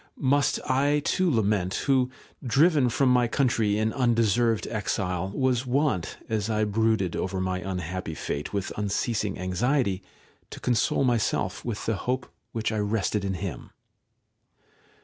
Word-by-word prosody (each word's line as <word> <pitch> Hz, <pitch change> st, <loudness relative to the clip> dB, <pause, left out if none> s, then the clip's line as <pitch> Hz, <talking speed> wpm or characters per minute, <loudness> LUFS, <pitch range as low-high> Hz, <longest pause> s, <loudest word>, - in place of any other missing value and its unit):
must 140 Hz, 0 st, +2 dB
I 140 Hz, +3 st, +2 dB
too 185 Hz, -1 st, +2 dB
lament, 105 Hz, -, +1 dB
who, 130 Hz, -2 st, +3 dB, 0.3 s
driven 140 Hz, +2 st, +4 dB
from 130 Hz, +2 st, +2 dB
my 125 Hz, -1 st, +4 dB
country, 115 Hz, -5 st, +1 dB
in 110 Hz, +1 st, 0 dB
undeserved 115 Hz, -2 st, +2 dB
exile, 95 Hz, -3 st, -1 dB
was 130 Hz, +3 st, 0 dB
wont, 130 Hz, -, 0 dB
as 110 Hz, -2 st, -1 dB
I 110 Hz, -1 st, +1 dB
brooded 105 Hz, -3 st, +1 dB
over 95 Hz, 0 st, -2 dB
my 95 Hz, 0 st, -1 dB
unhappy 90 Hz, -2 st, -4 dB
fate 75 Hz, -1 st, -4 dB
with 100 Hz, -2 st, -3 dB
unceasing 105 Hz, 0 st, -1 dB
anxiety, 100 Hz, +3 st, 0 dB, 0.5 s
to -, -, -9 dB
console 120 Hz, +2 st, +1 dB
myself 120 Hz, -4 st, 0 dB
with 115 Hz, -4 st, -4 dB
the 110 Hz, -2 st, 0 dB
hope 125 Hz, +4 st, -2 dB, 0.2 s
which 110 Hz, 0 st, -2 dB
I 110 Hz, -, -1 dB
rested 105 Hz, 0 st, 0 dB
in 95 Hz, -1 st, -1 dB
him. 90 Hz, 0 st, -5 dB
110 Hz, 140 wpm, -26 LUFS, 100-125 Hz, 0.5 s, driven